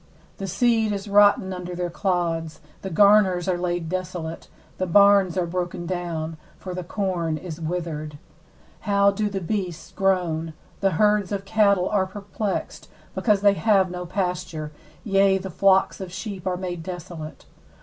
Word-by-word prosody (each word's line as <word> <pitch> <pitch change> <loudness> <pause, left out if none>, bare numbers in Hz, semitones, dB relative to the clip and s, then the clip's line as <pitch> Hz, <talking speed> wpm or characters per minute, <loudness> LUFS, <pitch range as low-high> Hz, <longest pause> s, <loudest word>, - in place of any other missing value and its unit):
17The 195 -1 -4
seed 225 +1 +2
is 200 +1 -5
rotten 205 -2 +4
under 180 -1 -6
their 175 -1 -3
clods, 170 -4 -1 0.2
the 190 - -5
garners 195 -1 +4
are 185 - +2
laid 175 -1 -2
desolate, 175 -2 -5 0.3
the 185 - 0
barns 200 0 +5
are 180 - +1
broken 175 0 -3
down; 165 -3 -3 0.2
for 185 - -7
the 180 0 -4
corn 175 -4 -2
is 165 0 -8
withered. 155 -3 -4 0.7
18How 200 -1 +3
do 210 0 0
the 195 -1 -3
beasts 180 -3 -4
groan! 170 -4 0 0.3
the 195 -2 +1
herds 210 -1 +3
of 200 -1 -3
cattle 200 -3 +3
are 195 -3 +1
perplexed, 200 +1 -4 0.2
because 210 -4 +2
they 200 -1 +5
have 195 -3 +2
no 180 0 -5
pasture; 180 -4 -3 0.3
yea, 195 -3 +3
the 190 0 -6
flocks 195 +2 +3
of 185 -2 -6
sheep 190 0 -6
are 180 -1 0
made 180 -2 -4
desolate. 170 -2 -8
185 Hz, 155 wpm, -24 LUFS, 175-200 Hz, 0.7 s, barns